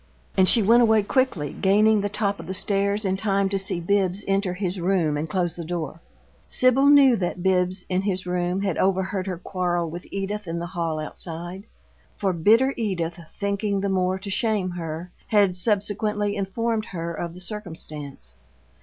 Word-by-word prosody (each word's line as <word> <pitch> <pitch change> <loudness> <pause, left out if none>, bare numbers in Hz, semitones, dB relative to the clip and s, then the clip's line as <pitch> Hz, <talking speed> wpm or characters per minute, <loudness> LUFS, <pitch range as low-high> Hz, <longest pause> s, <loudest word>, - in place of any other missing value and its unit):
And 190 -1 +5
she 230 - +5
went 230 +4 +6
away 220 -2 +4
quickly, 200 - 0
gaining 210 +2 +3
the 205 - -1
top 200 -1 -1
of - - -9
the 190 - -3
stairs 200 +2 +1
in 190 0 0
time 195 -1 +1
to 195 0 -1
see 190 -2 -2
Bibbs 195 +2 +1
enter 195 -2 0
his 185 -1 -3
room 170 -4 +1
and 150 +2 -3
close 175 -4 -1
the 170 - -5
door. 165 -1 -4 0.5
Sibyl 255 +2 +4
knew 280 -3 +7
that 175 -1 -3
Bibbs, 185 0 +1
in 185 0 0
his 190 -2 -2
room, 180 +1 -1
had 190 -5 -1
overheard 190 0 0
her 185 -2 -3
quarrel 175 -2 -2
with 175 +2 -8
Edith 195 +1 -4
in 165 0 -3
the 170 - -3
hall 165 -3 -1
outside; 175 +5 -6 0.5
for 195 -2 -1
bitter 225 +11 +4
Edith, 175 -7 -2 0.2
thinking 200 0 -1
the 200 - -1
more 185 -1 +1
to 195 +1 -7
shame 210 -3 0
her, 170 0 -6 0.2
had 200 -4 +3
subsequently 205 +1 0
informed 215 +3 -1
her 170 -2 -5
of 170 +1 -5
the - - -10
circumstance. 165 -8 -7
190 Hz, 180 wpm, -24 LUFS, 175-205 Hz, 0.5 s, knew